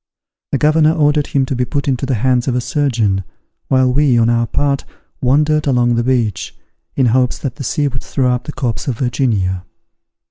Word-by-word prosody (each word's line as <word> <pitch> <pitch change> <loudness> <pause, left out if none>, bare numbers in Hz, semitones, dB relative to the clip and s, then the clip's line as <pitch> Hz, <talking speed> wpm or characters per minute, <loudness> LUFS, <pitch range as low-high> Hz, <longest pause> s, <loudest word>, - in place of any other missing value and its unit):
The - - +1
governor 155 +2 +3
ordered 150 -2 +2
him 135 -1 +1
to 130 - -3
be 125 - 0
put 140 +3 -3
into 135 0 -1
the 130 - 0
hands 125 +2 +1
of 125 - 0
a - - +1
surgeon, 120 -7 0 0.4
while 130 -1 +2
we, 140 -3 +3
on 115 0 +3
our 115 0 +1
part, 140 +1 0 0.4
wandered 150 +4 +2
along 120 -3 +2
the 120 0 0
beach, 120 -5 -1 0.4
in 135 - +2
hopes 125 +1 +2
that 135 -2 -5
the 140 - -6
sea 145 +3 0
would 130 -2 -5
throw 125 -3 0
up 125 - -3
the - - -5
corpse 125 -4 -3
of 125 -5 -2
Virginia. 110 -8 -1
130 Hz, 200 wpm, -16 LUFS, 120-140 Hz, 0.4 s, governor